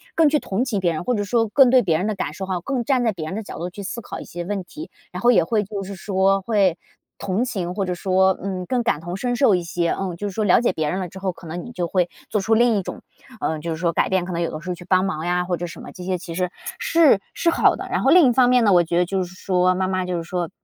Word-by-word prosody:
更 320 -2 +5
去 300 0 +2
同 215 +2 -2
情 215 -6 -1
别 175 -3 +1
人， 155 - -4
或 250 - 0
者 205 -3 0
说 225 +2 +1
更 260 +4 +5
对 255 0 +5
别 165 -5 +1
人 190 - -1
的 215 - -1
感 150 - -3
受 190 +4 -6
哈， 185 -2 -1
更 255 +5 -2
站 255 0 +1
在 225 - +2
别 165 -6 -6
人 185 - -5
的 220 - -4
角 - - -8
度 175 +2 -3
去 200 +3 -9
思 235 +5 -5
考 - - -7
一 - - -7
些 175 0 -6
问 200 0 -3
题。 305 - -10 0.2
然 - - -6
后 240 - +4
也 205 -8 +5
会 210 +4 0
就 200 0 -5
是 195 +1 -7
说， 195 +1 +1
会 195 -4 +2 0.4
同 200 +5 -1
情， 185 -8 -3
或 200 -2 -1
者 180 - -2
说， 190 +1 +2
嗯， 185 -2 -3
更 245 +4 0
感 235 -10 +1
同 175 +2 -6
身 245 +5 -1
受 240 -7 +4
一 180 - -1
些， 170 0 -1
嗯， 185 -3 -3
就 205 - -3
是 200 - -6
说 215 - -1
了 190 -4 +5
解 235 -5 +1
别 155 -3 -1
人 185 - -2
了 185 - -3
之 190 +3 -11
后， 190 -1 -1
可 175 -1 -13
能 175 +2 -5
你 240 - -9
就 180 -7 -2
会 180 0 +1 0.2
做 210 - 0
出 220 +3 +1
另 235 0 +4
一 - - 0
种， - - -7 0.4
呃， 160 -4 -2
就 165 +2 -4
是 160 - -3
说 170 0 0
改 - - +1
变。 185 -2 +1
可 180 - -5
能 170 - -2
有 170 - -1
的 155 - -5
时 185 - -7
候 180 - -2
去 175 - -12
帮 185 +1 +3
忙 160 -4 -3
呀 180 0 0
或 180 0 -1
者 175 - -4
什 170 - -10
么 - - -9
这 180 - -10
些 185 0 -1
其 170 -1 -8
实， 180 +1 -1 0.3
是 315 -11 +4
是 340 - +1
好 - - +3
的， - - -6
然 - - 0
后 - - +3
另 345 -5 +7
一 - - +4
方 250 0 +4
面 250 -1 +4
呢， 205 - +5
我 175 -1 +5
觉 170 +1 -1
得 180 - +3
就 190 +1 -1
是 180 0 -10
说 185 -1 +2
妈 185 0 0
妈 185 -1 -1
就 180 -1 -2
是 165 - -4
说， 175 0 -3
190 Hz, 350 characters per minute, -22 LUFS, 175-220 Hz, 0.4 s, 另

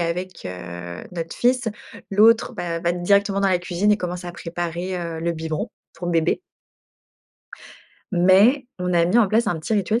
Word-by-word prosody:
avec, 175 +2 -3
heu, 90 -1 -7
notre 165 -1 -5
fils, 245 -1 +2 0.4
l'autre, 220 +4 +5
bah, 170 -6 -3
va 170 0 +1
directement 200 +3 +2
dans 200 - +3
la 185 -1 +2
cuisine 180 +3 0
et 210 - +5
commence 180 -2 -5
à 175 - -6
préparer, 175 +1 -4
heu, 165 -2 -4
le 170 +1 0
biberon, 160 -1 -4 0.2
pour 175 - -6
bébé. 165 - +1 1.7
Mais, 195 +10 +5
on 180 0 -1
a 170 -1 +4
mis 180 +6 +2
en 215 - +4
place 225 +4 +2
un 170 - 0
petit 155 - -4
rituel, 210 +3 +1
180 Hz, 175 wpm, -22 LUFS, 170-200 Hz, 1.7 s, l'autre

